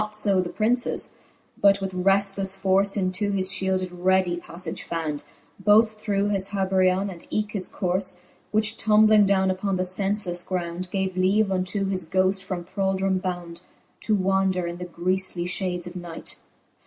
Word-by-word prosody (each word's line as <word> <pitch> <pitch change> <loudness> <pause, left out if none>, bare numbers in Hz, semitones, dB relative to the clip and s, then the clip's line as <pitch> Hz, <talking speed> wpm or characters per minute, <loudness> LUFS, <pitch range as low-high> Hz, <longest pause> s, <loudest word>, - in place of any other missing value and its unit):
Not 215 0 -4
fb 205 -3 +2
the 175 - -5
Princes, 240 +5 0 0.5
but 200 0 +5
with 195 -1 -3
reftlefle 195 +1 +1
force 195 +1 +2
Into 190 +1 -1
his 190 -2 +1
fliield 190 -1 +1
it 185 - -6
readie 180 0 +1
pafTage 170 -1 -6
found, 155 -3 -4 0.4
Both 215 +2 +4
through 205 -1 0
his 195 -2 +1
haberjeon, 190 -1 +1
and 170 -2 -9
eke 215 0 -1
his 195 -4 -2
corfe: 185 0 -1 0.3
Which 215 +1 +1
tombling 215 -1 +5
downe 190 -1 +2
upon 190 +1 -2
the 185 - 0
(enfelefle 185 -1 0
ground, 180 0 -3
Gave 190 -2 -1
leave 195 +3 +2
unto 190 +2 -1
his 185 -4 -2
ghoft 190 +1 +2
from 185 -2 -5
thraldome 190 0 0
bound, 175 -2 -5 0.4
To 215 - +1
wander 190 -2 +1
in 170 0 -5
the 180 - -5
griefly 180 +1 0
fhades 180 -1 -2
of 175 +1 -9
night. 175 -2 -6
190 Hz, 165 wpm, -24 LUFS, 180-200 Hz, 0.5 s, but